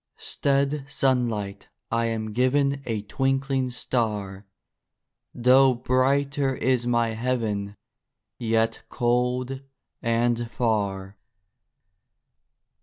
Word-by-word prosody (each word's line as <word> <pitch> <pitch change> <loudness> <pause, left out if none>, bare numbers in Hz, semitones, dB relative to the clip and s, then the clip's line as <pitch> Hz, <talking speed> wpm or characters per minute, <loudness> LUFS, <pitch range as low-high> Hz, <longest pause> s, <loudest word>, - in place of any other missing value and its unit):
Stead 140 0 0
sunlight 120 -8 -1 0.2
I 115 0 +1
am 110 -2 -3
given 140 +3 +2
A 110 -3 -2
twinkling 135 +2 0
star; 105 -6 -2 0.8
Though 130 +2 +5
brighter 135 +2 +1
is 125 -2 +1
my 120 -1 +2
heaven— 110 -4 -2 0.6
Yet 115 0 +1
cold 125 +2 0 0.4
and 120 0 +1
far. 100 -5 -1
120 Hz, 80 wpm, -25 LUFS, 110-135 Hz, 0.8 s, Though